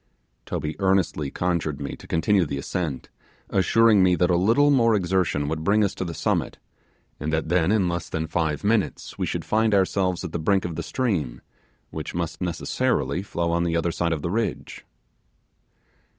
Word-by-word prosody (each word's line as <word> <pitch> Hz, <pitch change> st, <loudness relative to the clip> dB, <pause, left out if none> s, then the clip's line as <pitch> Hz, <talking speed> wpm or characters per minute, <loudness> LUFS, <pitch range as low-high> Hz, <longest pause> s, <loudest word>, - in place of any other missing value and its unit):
Toby 75 Hz, +2 st, -3 dB
earnestly 95 Hz, -7 st, +1 dB
conjured 85 Hz, -3 st, -1 dB
me 70 Hz, -, -5 dB
to -, -, -15 dB
continue 90 Hz, +4 st, +2 dB
the 70 Hz, -3 st, -3 dB
ascent, 70 Hz, 0 st, -4 dB, 0.4 s
assuring 105 Hz, +2 st, +4 dB
me 90 Hz, -1 st, +4 dB
that 90 Hz, 0 st, +2 dB
a -, -, +3 dB
little 115 Hz, +11 st, +4 dB
more 115 Hz, -5 st, +4 dB
exertion 90 Hz, -6 st, 0 dB
would 80 Hz, +1 st, -3 dB
bring 105 Hz, +5 st, +3 dB
us 100 Hz, -, 0 dB
to -, -, -4 dB
the 85 Hz, -2 st, -5 dB
summit, -, -, -1 dB, 0.6 s
and 75 Hz, +2 st, -3 dB
that 80 Hz, 0 st, -1 dB
then 90 Hz, +1 st, +2 dB
in 105 Hz, -4 st, +2 dB
less 85 Hz, -1 st, -3 dB
than 80 Hz, 0 st, -2 dB
five 80 Hz, -2 st, -1 dB
minutes 105 Hz, 0 st, -1 dB
we -, -, 0 dB
should -, -, -3 dB
find 110 Hz, -1 st, +2 dB
ourselves 95 Hz, -1 st, +1 dB
at 90 Hz, -, -5 dB
the 85 Hz, -, -3 dB
brink 95 Hz, +4 st, +1 dB
of 85 Hz, -2 st, -4 dB
the -, -, -3 dB
stream, 80 Hz, -, -2 dB, 0.5 s
which -, -, -6 dB
must 85 Hz, -1 st, -3 dB
necessarily 90 Hz, 0 st, -1 dB
flow 85 Hz, -4 st, -2 dB
on 85 Hz, 0 st, +1 dB
the 85 Hz, -1 st, 0 dB
other 85 Hz, 0 st, 0 dB
side 85 Hz, 0 st, -1 dB
of 80 Hz, -3 st, -2 dB
the 85 Hz, -, -2 dB
ridge. 115 Hz, +3 st, -3 dB
85 Hz, 185 wpm, -24 LUFS, 80-100 Hz, 0.6 s, assuring